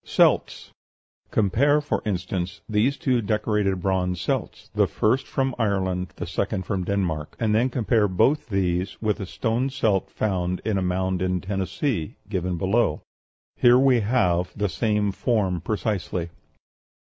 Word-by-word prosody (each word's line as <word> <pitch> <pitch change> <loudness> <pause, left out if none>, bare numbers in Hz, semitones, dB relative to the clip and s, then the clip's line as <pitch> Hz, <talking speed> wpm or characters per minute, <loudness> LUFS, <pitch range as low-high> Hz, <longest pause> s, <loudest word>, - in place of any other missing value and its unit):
CELTS - - +2 0.6
Compare, 125 +9 +3
for 145 - -2
instance, 90 -2 -3
these 115 +6 +1
two 125 -3 +1
decorated 105 -3 0
bronze 90 -2 0
celts, - - -3
the - - +3
first 130 +5 +1
from 135 -1 -1
Ireland, 95 -5 0
the - - -5
second 95 +3 -2
from 95 -2 -2
Denmark; 90 -6 -2
and 110 -2 +1
then 120 +4 +3
compare 115 -3 +2
both 115 +8 +2
these 95 -2 -1
with 110 0 0
a 100 - -5
stone 115 +7 -1
celt 110 -8 0
found 90 -4 -1
in 105 -3 +1
a - - -2
mound 90 0 -1
in 90 -1 0
Tennessee, 95 - -2
given 90 -3 -2
below. 100 +7 +1 0.5
Here 120 0 +6
we 130 -2 +4
have 90 -6 +1
the 105 0 0
same 105 +1 0
form 95 -5 0
precisely. 100 -5 -2
100 Hz, 145 wpm, -24 LUFS, 90-115 Hz, 0.6 s, Here